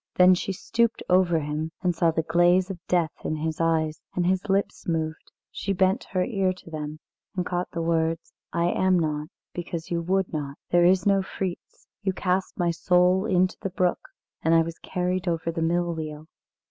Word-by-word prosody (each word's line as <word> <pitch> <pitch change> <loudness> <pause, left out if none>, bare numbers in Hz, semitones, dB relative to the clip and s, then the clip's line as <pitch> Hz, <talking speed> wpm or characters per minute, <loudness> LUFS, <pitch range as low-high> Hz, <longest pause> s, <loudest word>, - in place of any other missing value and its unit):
Then 180 0 +7
she 185 +2 -1
stooped 230 +4 0
over 180 -2 +4
him, 150 +2 -3
and 180 -2 +1
saw 165 0 +3
the 160 0 0
glaze 175 +3 +3
of 185 - -7
death 170 -4 +2
in 155 - -1
his 160 +1 -2
eyes, 160 -1 +1
and 180 - +1
his 190 +2 0
lips 195 +1 0
moved. 160 -1 -2 0.2
She 195 - -2
bent 190 +5 +2
her 185 -1 0
ear 195 -5 +1
to 180 -2 -15
them 155 0 -5 0.4
and 180 -1 -1
caught 180 0 -2
the 165 -2 -3
words: 165 0 0 0.2
"I 170 +1 +1
am 185 -1 +3
not, 150 -2 -1 0.3
because 170 -1 -5
you 170 -1 0
would 190 +2 0
not. 145 -2 -4
There 175 0 +5
is 180 0 +4
no 200 -1 +4
Fritz; 190 -1 -6 0.2
you 195 -2 0
cast 185 0 -1
my 175 -1 +2
soul 180 +4 +3
into 185 -2 +2
the 195 - -2
brook 180 -1 +1 0.4
and 165 +1 +3
I 165 - +5
was 165 0 -7
carried 180 0 -2
over 165 -1 0
the 165 0 -3
mill 170 +1 +1
wheel." 155 -1 -6
175 Hz, 195 wpm, -26 LUFS, 165-185 Hz, 0.4 s, Then